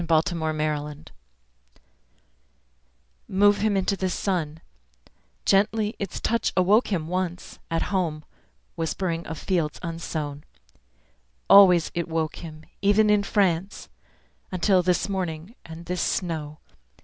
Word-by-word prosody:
Wilfred 165 Hz, +1 st, +2 dB
Owen 155 Hz, -1 st, -1 dB
Futility 150 Hz, -1 st, -3 dB, 2.2 s
HMove 205 Hz, +1 st, +4 dB
him 210 Hz, -2 st, +2 dB
into 195 Hz, +1 st, 0 dB
the 190 Hz, -1 st, -2 dB
sun 165 Hz, -5 st, -2 dB, 0.9 s
Gently 210 Hz, +2 st, +2 dB
its 200 Hz, -3 st, -4 dB
touch 230 Hz, 0 st, 0 dB
awoke 200 Hz, +6 st, +4 dB
him 170 Hz, -6 st, -2 dB
once, 180 Hz, 0 st, -4 dB
At 165 Hz, -, 0 dB
home, 160 Hz, -5 st, -1 dB, 0.5 s
whispering 165 Hz, +1 st, -2 dB
of 160 Hz, -, -5 dB
fields 165 Hz, -5 st, -1 dB
unsown. 155 Hz, -3 st, -4 dB, 1.0 s
Always 180 Hz, -5 st, +7 dB
it 170 Hz, -1 st, -2 dB
woke 160 Hz, -1 st, -2 dB
him, 155 Hz, -2 st, -9 dB, 0.2 s
even 210 Hz, +2 st, +4 dB
in 210 Hz, -1 st, +4 dB
France, 195 Hz, -2 st, 0 dB, 0.6 s
Until 185 Hz, +1 st, +3 dB
this 180 Hz, +1 st, +1 dB
morning, 180 Hz, -1 st, -4 dB
and 165 Hz, +1 st, -10 dB
this 180 Hz, 0 st, -2 dB
snow. 155 Hz, -4 st, -2 dB
175 Hz, 115 wpm, -25 LUFS, 160-195 Hz, 2.2 s, Always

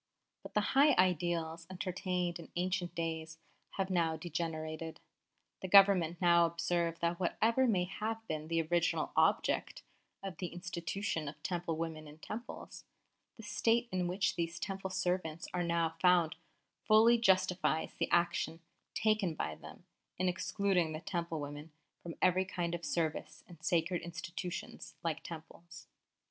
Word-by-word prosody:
But -, -, -11 dB
the 210 Hz, -, +4 dB
high 280 Hz, +1 st, +6 dB
ideals 170 Hz, -2 st, +1 dB
entertained 180 Hz, -1 st, -2 dB
in 165 Hz, -, -11 dB
ancient 180 Hz, 0 st, -1 dB
days 160 Hz, -1 st, -3 dB, 0.4 s
have 190 Hz, -1 st, -1 dB
now 165 Hz, -3 st, +1 dB
degenerated.... 160 Hz, -1 st, -4 dB, 0.6 s
The 190 Hz, -, -3 dB
Government 185 Hz, -4 st, +6 dB
now 170 Hz, -1 st, +5 dB
observe 170 Hz, 0 st, -1 dB
that 170 Hz, 0 st, 0 dB
whatever 230 Hz, +8 st, +2 dB
may 190 Hz, -6 st, +3 dB
have 220 Hz, +4 st, -4 dB
been 155 Hz, 0 st, -3 dB
the 165 Hz, 0 st, +1 dB
original 170 Hz, +2 st, +1 dB
object -, -, +2 dB, 0.4 s
of 190 Hz, -4 st, -5 dB
the 180 Hz, -, -3 dB
institution 175 Hz, -2 st, -3 dB
of 145 Hz, -, -8 dB
Temple 175 Hz, -3 st, -2 dB
women 160 Hz, -2 st, -4 dB
in 150 Hz, +1 st, -12 dB
Temples, 220 Hz, +8 st, -8 dB, 0.5 s
the 225 Hz, -, -10 dB
state 235 Hz, +3 st, +1 dB
in 180 Hz, -1 st, 0 dB
which 185 Hz, +2 st, 0 dB
these 170 Hz, 0 st, -2 dB
Temple 195 Hz, -1 st, -4 dB
servants 180 Hz, -3 st, -1 dB
are 180 Hz, -, 0 dB
now 170 Hz, -1 st, +1 dB
found 180 Hz, -3 st, +4 dB, 0.5 s
fully 230 Hz, +2 st, +6 dB
justifies 185 Hz, -6 st, +2 dB
the 165 Hz, -, -2 dB
action 170 Hz, -1 st, +1 dB, 0.4 s
taken 215 Hz, -6 st, +2 dB
by 80 Hz, -, -2 dB
them -, -, -12 dB, 0.3 s
in 185 Hz, -, +1 dB
excluding 180 Hz, -2 st, +1 dB
the 155 Hz, -, -4 dB
Temple 170 Hz, -3 st, -3 dB
women 145 Hz, +2 st, -7 dB, 0.3 s
from 170 Hz, -1 st, -7 dB
every 185 Hz, +1 st, +4 dB
kind 175 Hz, -2 st, -2 dB
of 170 Hz, 0 st, -4 dB
service 160 Hz, -3 st, -2 dB
in 170 Hz, -3 st, -14 dB
sacred 170 Hz, 0 st, +1 dB
institutions 175 Hz, +1 st, -6 dB
like 165 Hz, -2 st, -1 dB
Temples. 165 Hz, +1 st, -10 dB
175 Hz, 145 wpm, -34 LUFS, 165-185 Hz, 0.6 s, high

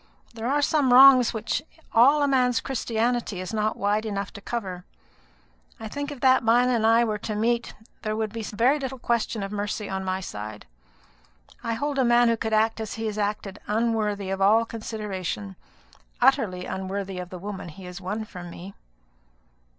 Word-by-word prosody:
There 230 Hz, 0 st, -4 dB
are 290 Hz, +2 st, +1 dB
some 280 Hz, -4 st, +2 dB
wrongs 255 Hz, -1 st, +8 dB
which 220 Hz, -1 st, -2 dB, 0.3 s
all 280 Hz, +6 st, +6 dB
a -, -, +3 dB
man's 250 Hz, -3 st, +2 dB
Christianity 235 Hz, -4 st, -1 dB
is 185 Hz, +3 st, -5 dB
not 215 Hz, 0 st, 0 dB
wide 205 Hz, +2 st, +1 dB
enough 200 Hz, -3 st, -4 dB
to 200 Hz, -, -10 dB
cover. 190 Hz, -6 st, -4 dB, 1.0 s
I 225 Hz, -, -6 dB
think 285 Hz, +6 st, -5 dB
if 275 Hz, -4 st, -9 dB
that 260 Hz, -1 st, +5 dB
man 240 Hz, +2 st, +4 dB
and 230 Hz, -3 st, +2 dB
I 230 Hz, +1 st, +5 dB
were 215 Hz, -2 st, -1 dB
to 215 Hz, +1 st, -4 dB
meet, 235 Hz, +2 st, 0 dB, 0.3 s
there 215 Hz, 0 st, -2 dB
would 220 Hz, -1 st, -2 dB
be 230 Hz, -, -4 dB
very 235 Hz, +7 st, +1 dB
little 265 Hz, -1 st, -4 dB
question 235 Hz, -3 st, -1 dB
of 195 Hz, -, -5 dB
mercy 210 Hz, 0 st, -3 dB
on 190 Hz, 0 st, -3 dB
my 185 Hz, 0 st, -1 dB
side. 105 Hz, -, -7 dB, 1.0 s
I 230 Hz, -1 st, -1 dB
hold 285 Hz, +2 st, -2 dB
a -, -, +4 dB
man 240 Hz, 0 st, +4 dB
who 230 Hz, -, +2 dB
could 220 Hz, 0 st, -3 dB
act 220 Hz, +1 st, +2 dB
as 220 Hz, -1 st, -4 dB
he 225 Hz, -, -4 dB
has 215 Hz, -1 st, -3 dB
acted 205 Hz, -1 st, -3 dB
unworthy 210 Hz, -3 st, 0 dB
of 195 Hz, 0 st, -3 dB
all 220 Hz, +4 st, +5 dB
consideration 190 Hz, -, -5 dB, 0.6 s
utterly 180 Hz, 0 st, +2 dB
unworthy 190 Hz, 0 st, -4 dB
of 180 Hz, -1 st, -6 dB
the 185 Hz, -, -7 dB
woman 195 Hz, -1 st, -6 dB
he 175 Hz, +5 st, -12 dB
has 180 Hz, +1 st, -8 dB
won 210 Hz, +4 st, -3 dB
from 180 Hz, -4 st, -9 dB
me." 180 Hz, +3 st, -10 dB
220 Hz, 185 wpm, -25 LUFS, 195-235 Hz, 1.0 s, wrongs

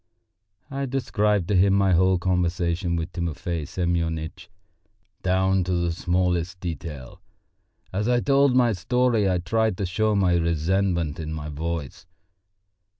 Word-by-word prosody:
I 135 Hz, 0 st, -2 dB
described 105 Hz, -7 st, 0 dB
to 105 Hz, -, +2 dB
him 95 Hz, +1 st, +4 dB
my 100 Hz, -1 st, +3 dB
whole 95 Hz, +1 st, +4 dB
conversation 85 Hz, -1 st, 0 dB
with 85 Hz, +1 st, -3 dB
Timofey 85 Hz, -2 st, -3 dB
Semyonitch 85 Hz, 0 st, -2 dB, 0.7 s
down 95 Hz, 0 st, +2 dB
to 90 Hz, -, -1 dB
the 85 Hz, -1 st, 0 dB
smallest 90 Hz, +1 st, -1 dB
detail. 80 Hz, -6 st, -7 dB, 0.7 s
As 105 Hz, +3 st, -1 dB
I 125 Hz, 0 st, +3 dB
told 140 Hz, 0 st, +3 dB
my 120 Hz, -3 st, +4 dB
story 115 Hz, +2 st, +1 dB
I 90 Hz, -, +1 dB
tried 110 Hz, +3 st, 0 dB
to 100 Hz, -, -1 dB
show 105 Hz, +4 st, 0 dB
my 90 Hz, -3 st, +3 dB
resentment 85 Hz, 0 st, 0 dB
in 80 Hz, -1 st, -5 dB
my 75 Hz, -1 st, -5 dB
voice. 80 Hz, +2 st, -5 dB
90 Hz, 135 wpm, -24 LUFS, 85-100 Hz, 0.7 s, him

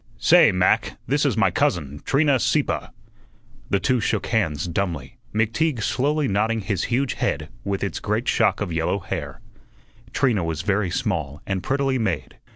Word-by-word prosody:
"Say, 160 Hz, +5 st, +6 dB
Mac, 90 Hz, 0 st, +1 dB
this -, -, +1 dB
is -, -, -1 dB
my -, -, +3 dB
cousin, 75 Hz, -4 st, -1 dB
Trina 140 Hz, -1 st, +3 dB
Sieppe." 135 Hz, +5 st, 0 dB, 0.8 s
The 100 Hz, -, +2 dB
two 125 Hz, +6 st, +1 dB
shook 110 Hz, -, -1 dB
hands 90 Hz, -9 st, 0 dB
dumbly, 85 Hz, -7 st, -3 dB
McTeague 115 Hz, +4 st, 0 dB
slowly 145 Hz, +5 st, +1 dB
nodding 110 Hz, +3 st, 0 dB
his 100 Hz, -2 st, -1 dB
huge 125 Hz, +2 st, 0 dB
head 80 Hz, +1 st, -2 dB
with 100 Hz, -1 st, -2 dB
its 100 Hz, -, -2 dB
great 110 Hz, +4 st, -2 dB
shock 115 Hz, -3 st, +2 dB
of 95 Hz, -5 st, -2 dB
yellow 80 Hz, +4 st, 0 dB
hair. 85 Hz, -3 st, -5 dB, 0.7 s
Trina 120 Hz, -9 st, +1 dB
was 80 Hz, 0 st, -3 dB
very 100 Hz, 0 st, +1 dB
small 85 Hz, -, -2 dB
and 95 Hz, -2 st, -2 dB
prettily 135 Hz, +4 st, 0 dB
made. 85 Hz, -, -3 dB
105 Hz, 160 wpm, -23 LUFS, 85-125 Hz, 0.8 s, Say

